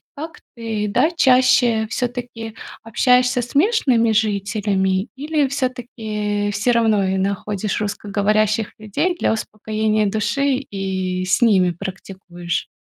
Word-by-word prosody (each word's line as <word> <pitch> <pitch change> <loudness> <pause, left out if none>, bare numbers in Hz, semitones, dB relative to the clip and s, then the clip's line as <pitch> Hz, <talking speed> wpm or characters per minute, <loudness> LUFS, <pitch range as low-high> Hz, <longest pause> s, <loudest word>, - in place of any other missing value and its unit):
как 320 +4 -8 0.2
ты, 220 -3 -3
да, 250 +9 +3
чаще 250 -6 +4
всё-таки 240 -2 -4 0.3
общаешься 250 +2 +2
с 240 - -8
местными 275 - +3
жителями 200 -2 0
или 295 +1 0
всё-таки 220 -6 -3
всё 210 +4 +1
равно 220 -3 +3
и 190 0 0
находишь 200 +1 -2
русскоговорящих 210 +1 0
людей 215 - -1
для - - +1
успокоения 215 0 -1
души 265 +7 0
и 190 -2 -2
с 185 - +1
ними 190 -6 +4
практикуешь? 180 -1 -6
215 Hz, 110 wpm, -20 LUFS, 200-245 Hz, 0.3 s, чаще